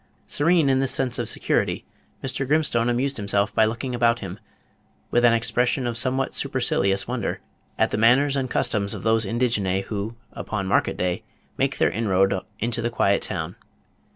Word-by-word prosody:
Serene 160 0 +2
in 135 -1 +3
this 135 -1 +3
sense 125 -2 +1
of - - 0
security, - - -1 0.4
Mr. 135 0 -2
Grimstone 135 -6 +2
amused 130 +3 0
himself 100 0 0
by 110 - +4
looking 115 +4 -3
about 120 -1 +2
him, 95 -1 -7 0.7
with 120 - +2
an 120 -1 +6
expression 125 +2 +1
of 120 -1 -2
somewhat 130 +3 0
supercilious 100 -8 0
wonder, 120 -3 -3 0.4
at - - +2
the - - -1
manners 135 +5 +4
and 130 -2 -1
customs 100 -4 +1
of - - -8
those 110 -1 +3
indigenæ 100 -5 0
who, 105 +2 -5 0.2
upon 105 -3 -4
market 95 - +1
day, 90 -1 -1 0.3
make - - -1
their - - +2
inroad 95 -3 +1 0.2
into 115 +2 -2
the 120 - -1
quiet 100 -4 +1
town. 85 -1 -3
115 Hz, 170 wpm, -23 LUFS, 100-130 Hz, 0.7 s, an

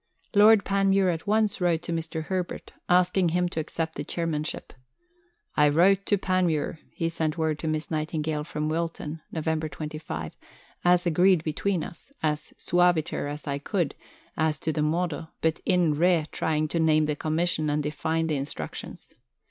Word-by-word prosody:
Lord 210 0 +7
Panmure 195 -1 +3
at 165 +5 -7
once 210 -2 +2
wrote 175 -2 +2
to - - -4
Mr. 160 -1 -3
Herbert, 185 +1 -4 0.2
asking 180 0 +4
him 180 +2 +1
to 165 - -3
accept 160 +1 -3
the - - -4
Chairmanship: 165 -2 -3 0.8
"I 150 0 +5
wrote 185 +6 +4
to 205 - +3
Panmure," 180 -5 0
he 165 - -2
sent 165 -1 -2
word 160 -2 0
to 160 - -4
Miss 155 +1 -2
Nightingale 155 -1 -1
from 150 -1 -3
Wilton 165 -1 -3
(Nov. 160 -2 -4
25), 155 - -5 0.5
"as 175 0 +4
agreed 175 0 +4
between 165 +2 -1
us, 220 - -10
as 150 -1 -1
suaviter 175 -4 +1
as 150 +1 -7
I 140 -1 -2
could 170 -1 -1 0.4
as 155 -1 0
to 160 - -1
the 150 - -1
modo, 160 0 -1
but 160 0 0
in 175 -4 +3
re 165 +1 +3
trying 155 -1 0
to 165 - -1
name 155 -1 +4
the 150 -1 -1
Commission 155 0 0
and 150 0 0
define 160 +2 -1
the 155 -3 0
Instructions. 140 +1 -6
160 Hz, 165 wpm, -26 LUFS, 155-180 Hz, 0.8 s, Lord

